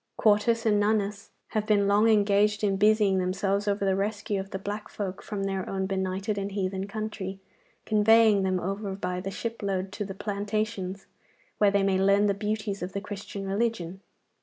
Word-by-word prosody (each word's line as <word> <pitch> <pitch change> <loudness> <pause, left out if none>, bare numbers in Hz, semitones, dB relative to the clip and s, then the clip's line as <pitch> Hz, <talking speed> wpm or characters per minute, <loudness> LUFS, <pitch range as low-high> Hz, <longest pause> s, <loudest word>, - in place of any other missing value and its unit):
Quartus 225 +2 +3
and 210 -2 +3
Nonus 205 -1 0 0.2
have 215 -1 -2
been 205 -2 +3
long 205 +3 +4
engaged 205 0 +3
in 200 -2 +2
busying 205 -1 +3
themselves 195 +2 0
over 200 0 +1
the 190 -1 +2
rescue 205 0 -2
of 190 0 -6
the 190 - -4
black 205 +2 -5
folk 195 -2 -5
from 205 -2 -4
their 195 -1 -2
own 190 -1 -1
benighted 190 +2 -2
and 200 0 -4
heathen 190 -1 -2
country, 205 -2 -5 0.5
conveying 215 -1 +5
them 185 -1 +1
over 195 +2 -3
by 180 -2 -3
the 190 +1 -4
shipload 195 -3 -3
to 210 - -4
the 195 -1 -6
plantations, 205 -1 -3 0.5
where 205 - +5
they 200 0 +2
may 195 -1 +2
learn 200 +2 +4
the 200 - +3
beauties 210 0 -3
of 180 +1 -5
the 200 - -2
Christian 200 -1 -7
religion. 195 -3 -2
200 Hz, 180 wpm, -27 LUFS, 195-210 Hz, 0.5 s, conveying